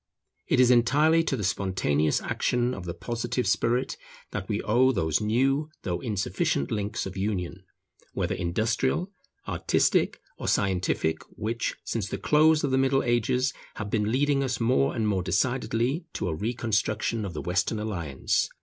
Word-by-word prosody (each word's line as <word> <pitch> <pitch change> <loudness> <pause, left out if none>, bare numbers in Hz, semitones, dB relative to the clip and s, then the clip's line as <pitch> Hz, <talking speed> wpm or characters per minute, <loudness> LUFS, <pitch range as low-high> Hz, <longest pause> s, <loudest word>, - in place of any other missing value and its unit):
It - - +2
is 125 -1 +6
entirely 145 +7 +4
to 135 - 0
the 105 - -3
spontaneous 90 -6 +1
action 120 0 0
of 95 -5 -7
the 85 - -4
Positive 120 +5 -2
spirit 125 +2 +1 0.3
that 95 -2 -5
we 105 -1 0
owe 125 +5 +4
those 80 - 0
new 135 +8 +1
though 90 -1 -2
insufficient 100 -9 -1
links 105 -1 -2
of 95 -1 -6
union, 95 -2 -3 0.5
whether - - -1
industrial, 110 - 0 0.4
artistic, - - +1 0.2
or - - -4
scientific, 90 -4 +1 0.2
which, 115 +3 -2
since 110 -4 -2
the - - -3
close 155 +1 +4
of 140 - 0
the 130 - +3
Middle 135 0 +2
Ages, 125 +2 +1 0.2
have 105 -1 -5
been 105 -1 +1
leading 140 +2 +2
us 130 -2 -2
more 130 +4 +2
and 110 -3 0
more 100 -3 +1
decidedly 125 - 0
to 95 - -2
a - - -1
reconstruction 110 +2 -1
of 95 -5 -5
the - - -3
Western 100 +5 0
alliance. 85 -11 -1
115 Hz, 160 wpm, -27 LUFS, 95-130 Hz, 0.5 s, is